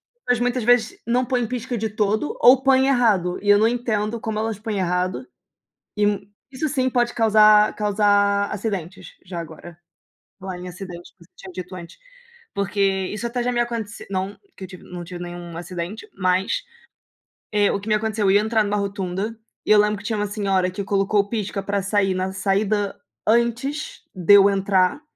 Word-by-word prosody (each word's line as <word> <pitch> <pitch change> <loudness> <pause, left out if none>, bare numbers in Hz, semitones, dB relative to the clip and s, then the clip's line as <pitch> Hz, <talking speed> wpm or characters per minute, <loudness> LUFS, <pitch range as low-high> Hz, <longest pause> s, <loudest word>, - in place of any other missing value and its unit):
E - - -45
as - - -51
pessoas 245 -2 +2
muitas 245 0 0
vezes 240 -1 +2
não 245 +2 +1
põem 245 -1 0
pisca 240 +1 -4
de 220 0 -2
todo 215 +5 -1
ou 255 +2 +7
põem 265 0 +4
errado 210 -9 +2
e 205 - -2
eu 205 - +7
não 220 - +4
entendo 230 -2 -1
como 220 -1 -3
elas 220 -1 -2
põem 215 -2 -3
errado 180 +6 -1 0.7
e 205 -1 0 0.2
isso 275 +4 -2
sim 260 -2 +1
pode 240 -1 +1
causar 215 -1 +5
causar 205 -1 +2
acidentes. 190 -3 -5
Já 175 -2 -6
agora, 165 +1 -9 0.6
em - - -70
falar 190 -1 -6
em 180 - -7
acidente, 180 -1 -9
que 170 - -18
você - - -33
tinha 190 - -11
dito 185 +1 -7
antes, 170 -2 -10 0.6
porque 200 0 -3 0.3
isso 210 +4 -5
até 245 +1 -3
já 250 - 0
me 240 - -1
acontece 230 -3 -3
não 190 +1 -3 0.2
que 190 - -8
eu - - -11
tive, 185 0 -12
não 180 -1 -8
tive 175 0 -8
nenhum 175 -1 -8
acidente, 175 +4 -6
mas, 185 - 0 0.9
eh, 205 -1 +3
o - - -1
que 205 - -9
me 215 - +3
aconteceu? 215 -1 0
Eu 190 - +4
ia 200 - +5
entrar 220 0 +1
numa 205 0 -1
rotunda 200 +2 -3 0.3
e - - -2
eu 215 - +7
lembro 210 -1 +1
que 205 - -12
tinha 220 -1 -2
uma 210 - 0
senhora 195 -3 0
que 200 +3 -5
colocou 200 +1 +2
o 200 - -2
pisca 205 -3 -3
pra 200 0 -1
sair 195 -1 +1
na 185 +1 -2
saída 200 +1 0 0.3
antes 235 +6 0
de 185 0 +3
eu 200 0 +8
entrar, 195 +4 +1
205 Hz, 200 wpm, -22 LUFS, 190-225 Hz, 0.9 s, eu